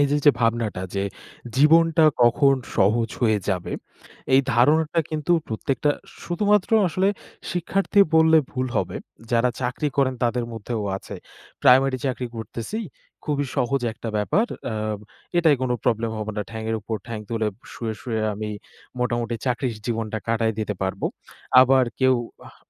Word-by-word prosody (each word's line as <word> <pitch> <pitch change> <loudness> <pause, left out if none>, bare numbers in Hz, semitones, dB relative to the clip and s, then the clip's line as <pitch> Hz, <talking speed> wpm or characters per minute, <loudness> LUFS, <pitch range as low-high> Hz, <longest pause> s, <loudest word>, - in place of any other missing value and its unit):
এই 145 - +5 0.2
যে 145 - +9
ভাবনাটা 115 -5 0
যে 100 0 0 0.5
জীবনটা 160 +2 +5 0.2
কখন 135 +3 +5 0.2
সহজ 110 +3 +3
হয়ে 110 -3 +3
যাবে। 90 -3 -1 0.6
এই 135 - +7
ধারণাটা 155 +6 +3
কিন্তু 155 +2 0 0.2
প্রত্যেকটা, 135 +5 0 0.3
শুধুমাত্র 205 +3 +1 0.2
আসলে 185 +4 +1 0.4
শিক্ষার্থী 190 +4 +1
বললে 160 0 +6
ভুল 130 -1 -2
হবে। - - -1 0.3
যারা 120 +1 +3
চাকরি 125 +4 -1
করেন 135 -2 +2
তাদের 120 0 0
মধ্যেও 115 0 -4
আছে। - - -9 0.5
প্রাইমারি 130 +1 +5
চাকরি 125 -1 -2
করতেছি। 115 - -5 0.5
খুবই 145 -1 -1
সহজ 135 +2 +1
একটা 115 0 -7
ব্যাপার। 155 - +1 0.3
"আ - - -3 0.6
এটায় 160 -5 +5
কোন 130 - -1
প্রবলেম 115 -1 +1
হবে 110 0 -4
না। 105 - 0
ঠ্যাঙের 110 0 -3
উপর 110 +2 -3
ঠ্যাং 115 -2 -5
তুলে 110 -2 0 0.2
শুয়ে, 110 -2 -4
শুয়ে 115 -3 -2
আমি 105 +1 -4 0.5
মোটামুটি 120 -1 -1
চাকরির 125 -1 0
জীবনটা 110 -2 -2
কাটায় 115 -1 +1
দিতে 105 -1 -2
পারবো।' 95 0 -1 0.5
আবার 130 0 +5 0.2
কেউ 130 0 +5 0.3
আহ - - -15
125 Hz, 145 wpm, -23 LUFS, 110-145 Hz, 0.6 s, যে